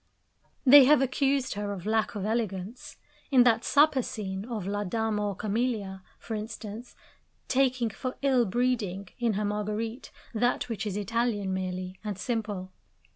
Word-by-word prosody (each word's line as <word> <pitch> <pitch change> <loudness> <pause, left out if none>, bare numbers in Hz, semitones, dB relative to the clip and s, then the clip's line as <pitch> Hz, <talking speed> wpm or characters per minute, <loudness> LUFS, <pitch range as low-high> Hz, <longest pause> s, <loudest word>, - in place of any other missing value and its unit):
They 275 +1 +10
have 295 +1 +6
accused 270 0 +1
her 205 0 -3
of 190 -2 -6
lack 220 0 0
of 200 -1 -3
elegance 215 0 -3 0.3
in 260 -4 +6
that 230 -1 +3
supper 290 -2 +4
scene 200 -5 -5
of 225 -6 -4
La 205 +1 -1
Dame 220 +2 -1
aux 205 -1 -1
Camelias, 210 -2 -2 0.2
for 225 - -7
instance; 215 +1 -6 0.5
taking 255 -3 +2
for 255 +5 -5
ill 260 -4 +4
breeding, 205 -4 -1
in 235 -2 +1
her 210 +1 -1
Marguerite, 210 +3 -3 0.2
that 245 +2 0
which 220 -1 -3
is 200 -1 -3
Italian 210 -2 -1
merely 185 0 -4
and 210 -3 -4
simple. 205 -5 -3
220 Hz, 150 wpm, -28 LUFS, 200-245 Hz, 0.5 s, They